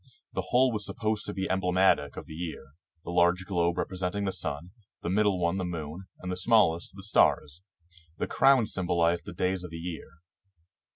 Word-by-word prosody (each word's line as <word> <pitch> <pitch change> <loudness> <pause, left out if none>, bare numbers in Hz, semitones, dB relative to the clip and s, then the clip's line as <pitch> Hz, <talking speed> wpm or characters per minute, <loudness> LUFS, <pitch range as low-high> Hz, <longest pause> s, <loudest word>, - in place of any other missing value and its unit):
The - - -2
whole 130 +1 +4
was 105 -2 -2
supposed 110 0 -2
to 105 - -4
be 95 0 -2
emblematic 90 -5 +2
of - - -6
the - - -10
year; 80 -4 -6 0.3
the - - -6
large 90 +1 +3
globe 85 -2 0
representing 95 +2 -2
the 95 - 0
sun, 85 -1 -4 0.3
the 85 - -1
middle 100 -1 +2
one 85 +1 +1
the - - -1
moon, 85 +1 -5
and 90 - -6
the 90 - -2
smallest 95 -4 +2
the 95 - -9
stars. 80 -6 +2 0.6
The - - -1
crowns 135 -5 +3
symbol 90 -2 -1
ized 85 +1 +2
the 100 - -7
days 90 +1 -1
of 90 - -7
the 85 - -7
year. 85 0 -6
90 Hz, 190 wpm, -28 LUFS, 85-100 Hz, 0.6 s, whole